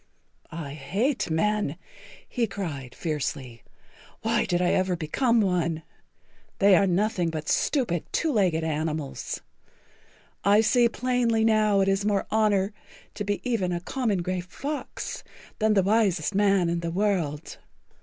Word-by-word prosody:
"I 160 Hz, -4 st, -6 dB
hate 200 Hz, -, -1 dB
men," 170 Hz, -1 st, 0 dB, 0.5 s
he 235 Hz, -2 st, -1 dB
cried 145 Hz, -12 st, -6 dB
fiercely. 135 Hz, -7 st, -4 dB, 0.6 s
"Why -, -, +1 dB
did 175 Hz, -, 0 dB
I 180 Hz, 0 st, +2 dB
ever 185 Hz, -1 st, +1 dB
become 230 Hz, -, +1 dB
one? 170 Hz, -4 st, 0 dB, 0.7 s
They 200 Hz, -1 st, +6 dB
are 195 Hz, +1 st, +4 dB
nothing 185 Hz, -1 st, +1 dB
but 155 Hz, -1 st, -5 dB
stupid, 235 Hz, -, 0 dB
two 320 Hz, -, 0 dB
legged 180 Hz, -, +2 dB
animals. 155 Hz, -2 st, -3 dB, 1.0 s
I 205 Hz, +2 st, +5 dB
see 235 Hz, +2 st, +4 dB
plainly 235 Hz, -2 st, +1 dB
now 215 Hz, -2 st, +3 dB
that 195 Hz, 0 st, +3 dB
it -, -, +4 dB
is 195 Hz, +1 st, 0 dB
more 205 Hz, -1 st, +1 dB
honor 210 Hz, -2 st, +2 dB, 0.4 s
to 205 Hz, -, -4 dB
be 205 Hz, +4 st, -3 dB
even 205 Hz, -7 st, 0 dB
a 175 Hz, -, -1 dB
common 210 Hz, -2 st, -1 dB
gray 185 Hz, +1 st, -2 dB
fox 275 Hz, +10 st, -6 dB, 0.4 s
than 215 Hz, -1 st, +3 dB
the 195 Hz, -, +4 dB
wisest 200 Hz, -4 st, +2 dB
man 195 Hz, -3 st, +3 dB
in 170 Hz, 0 st, 0 dB
the 170 Hz, 0 st, -3 dB
world. 170 Hz, -5 st, -1 dB
195 Hz, 145 wpm, -26 LUFS, 165-215 Hz, 1.0 s, They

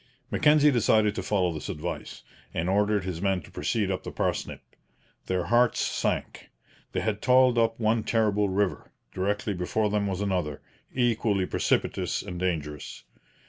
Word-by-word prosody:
Mackenzie 150 Hz, 0 st, +5 dB
decided 110 Hz, -3 st, +3 dB
to -, -, -3 dB
follow 90 Hz, -4 st, 0 dB
this 75 Hz, -, -6 dB
advice, 75 Hz, -, -5 dB, 0.3 s
and 85 Hz, -, -1 dB
ordered 105 Hz, +1 st, +2 dB
his 90 Hz, -2 st, -4 dB
men 95 Hz, -1 st, +1 dB
to -, -, -15 dB
proceed 105 Hz, -4 st, -1 dB
up 95 Hz, -, -2 dB
the -, -, -7 dB
Parsnip. -, -, -2 dB, 0.6 s
Their 90 Hz, -1 st, 0 dB
hearts 120 Hz, +6 st, +3 dB
sank. -, -, -2 dB, 0.4 s
They -, -, -1 dB
had 105 Hz, +1 st, -2 dB
toiled 125 Hz, -1 st, +5 dB
up 115 Hz, 0 st, +1 dB
one 110 Hz, 0 st, +1 dB
terrible 105 Hz, -3 st, +1 dB
river; 95 Hz, 0 st, -1 dB, 0.2 s
directly 100 Hz, +2 st, -1 dB
before 100 Hz, +4 st, -1 dB
them 105 Hz, -1 st, 0 dB
was 95 Hz, -1 st, -2 dB
another, 90 Hz, -8 st, -1 dB, 0.3 s
equally 110 Hz, -6 st, +1 dB
precipitous -, -, 0 dB
and 90 Hz, -1 st, -6 dB
dangerous. 75 Hz, -5 st, -3 dB
100 Hz, 150 wpm, -27 LUFS, 90-110 Hz, 0.6 s, Mackenzie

